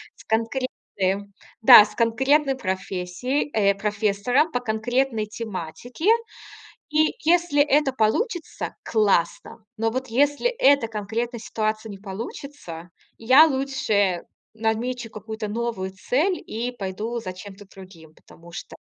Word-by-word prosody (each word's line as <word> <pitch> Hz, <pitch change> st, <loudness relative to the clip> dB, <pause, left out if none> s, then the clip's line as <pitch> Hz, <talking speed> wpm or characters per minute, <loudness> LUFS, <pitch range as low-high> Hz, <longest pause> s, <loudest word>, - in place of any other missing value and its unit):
с -, -, -16 dB
конкретным, 220 Hz, -4 st, -2 dB, 0.3 s
да, 220 Hz, -, +10 dB
с 210 Hz, 0 st, -8 dB
конкретной 265 Hz, +5 st, +2 dB
профессией, 190 Hz, +6 st, -3 dB
э, 200 Hz, -2 st, +3 dB
профессора, 210 Hz, +6 st, +1 dB
по 245 Hz, -5 st, -2 dB
конкретной 230 Hz, +1 st, -1 dB
тематике. 215 Hz, -, -7 dB, 0.9 s
И 310 Hz, +1 st, +2 dB
если 340 Hz, -4 st, +3 dB
это 290 Hz, -1 st, +2 dB
получится- 320 Hz, -, -1 dB
классно. 210 Hz, +1 st, 0 dB
Но 225 Hz, +1 st, +1 dB
вот 260 Hz, +3 st, -4 dB
если 285 Hz, -, +2 dB
эта 280 Hz, -, +3 dB
конкретная 225 Hz, +3 st, -4 dB
ситуация 215 Hz, 0 st, -3 dB
не 200 Hz, -, -8 dB
получится, 195 Hz, -, -8 dB, 0.3 s
я 260 Hz, +7 st, +7 dB
лучше 260 Hz, -, 0 dB, 0.3 s
намечу 225 Hz, +2 st, -2 dB
какую-то 220 Hz, 0 st, -6 dB
новую 225 Hz, -4 st, -3 dB
цель, 290 Hz, -, 0 dB
и 235 Hz, +3 st, -3 dB
пойду 220 Hz, +1 st, -4 dB
за 185 Hz, -5 st, -6 dB
чем-то 200 Hz, +2 st, -11 dB
другим. 185 Hz, -5 st, -15 dB
Потому 170 Hz, +1 st, -17 dB
что -, -, -8 dB
225 Hz, 115 wpm, -23 LUFS, 200-260 Hz, 0.9 s, да